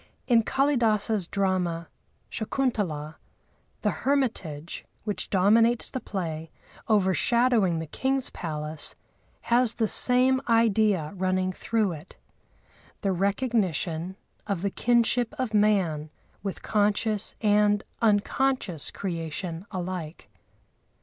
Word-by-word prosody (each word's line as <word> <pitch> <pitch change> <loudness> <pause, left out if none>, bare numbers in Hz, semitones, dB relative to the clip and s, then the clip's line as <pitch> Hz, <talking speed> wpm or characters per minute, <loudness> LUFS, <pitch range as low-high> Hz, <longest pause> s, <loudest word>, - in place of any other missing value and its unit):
In 235 -3 +4
Kâlidâsa's 225 -7 +1
drama, 180 -4 -1 0.4
Shakuntalâ, 205 - -2 0.7
the - - +2
hermitage, 200 - -1 0.2
which 210 -2 -2
dominates 225 +5 +3
the 260 - -3
play, 165 -7 -5 0.4
overshadowing 215 0 +3
the 160 - -4
king's 265 - 0
palace, 155 -2 -5 0.5
has 240 -1 +2
the 225 -2 +1
same 255 +3 +5
idea 215 -7 +2
running 185 0 0
through 215 +1 -1
it—the 175 +4 -10
recognition 190 -4 -1 0.3
of 195 -3 -2
the 200 - 0
kinship 240 +3 +1
of 255 -5 -2
man 190 -8 +2 0.3
with 195 -2 -5
conscious 210 0 +1
and 210 -1 +3 0.2
unconscious 215 - +1
creation 170 0 -5
alike. 175 - -6
205 Hz, 95 wpm, -26 LUFS, 175-230 Hz, 0.7 s, same